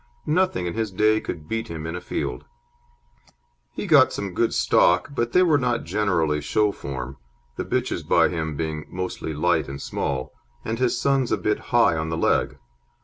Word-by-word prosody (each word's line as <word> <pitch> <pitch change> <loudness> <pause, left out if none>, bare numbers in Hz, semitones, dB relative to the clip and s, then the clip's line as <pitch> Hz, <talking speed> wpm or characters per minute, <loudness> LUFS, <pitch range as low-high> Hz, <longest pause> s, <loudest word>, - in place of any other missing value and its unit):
Nothing 160 - +1
in 85 - -3
his 110 -1 -2
day 110 +3 +3
could 75 -3 -6
beat 115 +3 -3
him 80 -1 -6
in 80 +1 -4
a 90 - -5
field. 60 -7 -4 1.3
He - - -5
got - - +6
some 100 -3 -4
good 115 +5 +1
stock, 90 +8 +3
but 120 -3 -1
they 180 - +5
were 155 -5 +4
not 125 -2 0
generally 85 -8 0
show 105 +7 +1
form, 65 -4 -6 0.4
the - - -4
bitches - - -1
by - - +3
him 80 -3 -3
being 80 -1 -3
mostly 90 -3 -4
light 75 0 +1
and 70 0 -6
small, 65 -2 -3 0.3
and 115 +1 -2
his 125 -1 +1
sons 135 -3 +1
a - - +2
bit - - 0
high - - +4
on 80 0 -2
the 80 - -2
leg. 75 -2 +1
90 Hz, 185 wpm, -24 LUFS, 80-115 Hz, 1.3 s, got